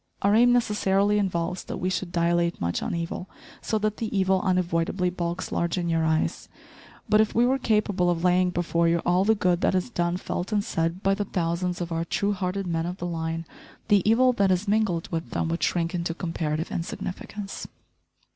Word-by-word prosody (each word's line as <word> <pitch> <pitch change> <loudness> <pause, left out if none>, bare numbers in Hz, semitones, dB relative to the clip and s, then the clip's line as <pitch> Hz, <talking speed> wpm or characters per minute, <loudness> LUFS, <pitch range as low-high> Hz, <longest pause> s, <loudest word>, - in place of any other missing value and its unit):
Our 200 +1 +4
aim 240 +3 +6
necessarily 210 -3 +2
involves 180 -2 -1
that - - -5
we 185 +1 -1
should 185 -1 -3
dilate 170 0 +1
much 85 0 -1
on - - -2
evil, 170 +2 -4 0.3
so 220 - -1
that 215 0 -1
the 225 - -2
evil 190 0 +2
unavoidably 180 -1 0
bulks 175 0 -3
large 170 +1 0
in 175 -1 -1
your 165 -1 +1
eyes; 160 0 0 0.6
but 215 -1 +5
if 220 - -1
we 235 +2 +4
were 265 +2 +2
capable 210 -6 +1
of 170 -1 -1
laying 180 0 +3
before 170 -1 +1
you 170 +1 +3
all 180 +2 +3
the 220 +1 +4
good 180 -3 +1
that - - +2
is 185 +6 -1
done, 175 -3 0
felt 180 +2 -4
and 205 -1 +1
said 170 -4 -2
by 195 - +3
the 205 +1 -2
thousands 175 0 -2
of 175 -1 -4
our 165 0 -1
true 200 +4 0
hearted 190 0 -2
men 165 -1 -1
of 180 +1 -5
the 175 - -5
line, 165 -1 -3 0.4
the 205 -2 +5
evil 250 +3 +5
that 200 -4 +2
is 185 +3 +1
mingled 200 -5 +1
with 165 0 -3
them - - -1
would 165 +1 -2
shrink 170 -1 0
into 170 -1 -2
comparative 160 -2 -3
insignificance. 195 +3 -5
180 Hz, 205 wpm, -26 LUFS, 170-200 Hz, 0.6 s, aim